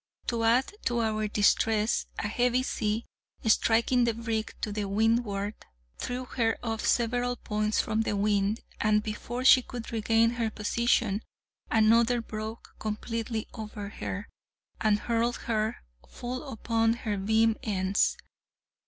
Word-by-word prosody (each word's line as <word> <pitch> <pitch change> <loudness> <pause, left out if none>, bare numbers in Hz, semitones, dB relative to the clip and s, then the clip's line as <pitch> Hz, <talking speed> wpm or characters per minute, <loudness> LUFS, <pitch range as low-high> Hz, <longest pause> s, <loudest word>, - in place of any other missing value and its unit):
To 230 -1 -1
add 240 - +3
to 240 -1 +1
our 215 -1 0
distress, 215 +1 +2
a - - -1
heavy 245 +3 +1
sea, 215 -2 -1 0.4
striking 230 +3 +3
the 230 -2 0
brig 225 -1 -2
to 210 - -2
the 205 0 -2
windward, 210 0 +1 0.5
threw 250 +1 -3
her 230 -3 0
off 225 -2 -2
several 245 +1 +1
points 215 -2 -1
from 220 0 0
the 210 -2 -1
wind, 205 +1 +1 0.2
and, 210 0 +3
before 240 +4 -4
she 260 - +8
could 245 -2 -7
regain 225 0 +3
her 235 -2 -1
position, 215 0 +1 0.5
another 230 +2 +4
broke 220 0 -7
completely 225 +1 -3
over 210 -2 -6
her, 200 -1 -5 0.5
and 210 -1 +2
hurled 235 +1 0
her 220 -1 -1 0.3
full 255 +4 -6
upon 225 0 +1
her 225 -3 -3
beam 220 +3 +3
ends. 195 -2 +1
225 Hz, 135 wpm, -28 LUFS, 215-235 Hz, 0.5 s, she